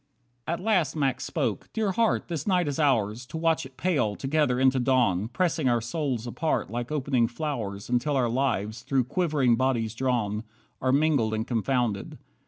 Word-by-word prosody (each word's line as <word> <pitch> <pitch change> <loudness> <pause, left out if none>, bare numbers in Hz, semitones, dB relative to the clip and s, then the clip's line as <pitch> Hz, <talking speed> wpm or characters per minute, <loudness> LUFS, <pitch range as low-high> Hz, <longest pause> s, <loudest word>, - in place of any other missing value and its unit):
43 165 - 0
At 180 +3 -5
last 185 - +2
Max 135 -4 0
spoke, - - -2
"Dear 215 -3 0
Heart, 225 +3 +1
this 165 -2 -4
night 180 -4 +2
is 145 0 -2
ours, 120 -6 +1
To 160 - -6
watch 160 -2 +1
it 130 - -24
pale, 140 - +1
together, 135 -1 +1
into 130 0 +4
dawn, 120 -7 +2
Pressing 160 +1 0
our 120 -1 +3
souls 125 0 -2
apart 155 -2 -1
like 120 +3 -4
opening 135 -5 +1
flowers 120 -7 -4
Until 125 +4 0
our 125 -2 +2
lives, 115 -4 -1
through 130 +1 +1
quivering 140 -5 +1
bodies 120 -4 0
drawn, 115 -4 -1 0.4
Are 130 - +2
mingled 140 -6 +2
and 110 +1 -2
confounded. 120 -3 -1
130 Hz, 175 wpm, -27 LUFS, 115-155 Hz, 0.4 s, into